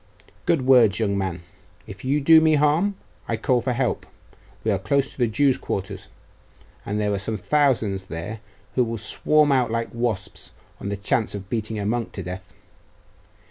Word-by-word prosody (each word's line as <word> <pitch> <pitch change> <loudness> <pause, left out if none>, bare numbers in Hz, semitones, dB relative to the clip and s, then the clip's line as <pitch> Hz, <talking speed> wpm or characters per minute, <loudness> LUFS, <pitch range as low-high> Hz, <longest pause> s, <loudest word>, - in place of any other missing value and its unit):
'Good 160 -6 +2
words 125 -6 +5
young 100 -3 0
man. 95 -3 -3 0.4
If - - -10
you 140 +3 +1
do 160 +3 +7
me 160 -1 +4
harm, 155 +7 +2 0.3
I 115 - -1
call 125 +2 +1
for 125 +2 -1
help; 125 0 -1 0.6
we 110 - +1
are 100 - +1
close 135 +7 0
to - - -15
the 120 - +3
Jews' 135 +4 +2
quarter, 95 -1 -3 0.9
and 105 +1 -2
there 105 -1 0
are 100 - -1
some 110 +2 -2
thousands 115 -6 +1
there 95 +5 -6 0.3
who 125 - +3
will 115 -1 -3
swarm 150 +6 +2
out 130 -3 +3
like 115 0 -2
wasps 110 -4 -3 0.3
on 100 - -5
the 100 - -2
chance 105 +2 0
of 100 -1 -8
beating 110 -1 -2
a 100 - -3
monk 115 +2 -1
to 95 - -5
death. 90 +1 -7
115 Hz, 180 wpm, -23 LUFS, 100-135 Hz, 0.9 s, do